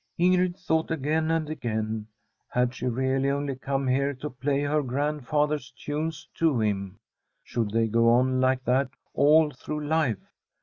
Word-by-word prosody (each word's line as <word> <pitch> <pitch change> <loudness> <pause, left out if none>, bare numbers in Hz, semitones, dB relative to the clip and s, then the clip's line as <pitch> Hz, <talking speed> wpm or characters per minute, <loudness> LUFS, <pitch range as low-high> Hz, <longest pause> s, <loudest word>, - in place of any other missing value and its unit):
Ingrid 180 0 +3
thought 160 -4 0
again 155 +1 0
and 165 -1 +1
again, 110 -6 -3 0.4
had 125 0 +1
she 130 - -4
really 130 +2 +1
only 140 -1 -1
come 135 +1 -2
here 140 +2 +1
to 150 +4 -6
play 140 +3 -1
her 150 +1 +1
grandfather's 145 +1 -1
tunes 155 +5 -4
to 160 -7 +2
him? 100 -3 -1 0.5
Should 115 -3 -2
they 115 +2 +2
go 115 +1 +3
on 130 +2 +3
like 130 0 +2
that 130 +2 +2 0.2
all 150 +2 +5
through 150 +3 -5
life 145 -10 -1
140 Hz, 150 wpm, -26 LUFS, 125-150 Hz, 0.5 s, all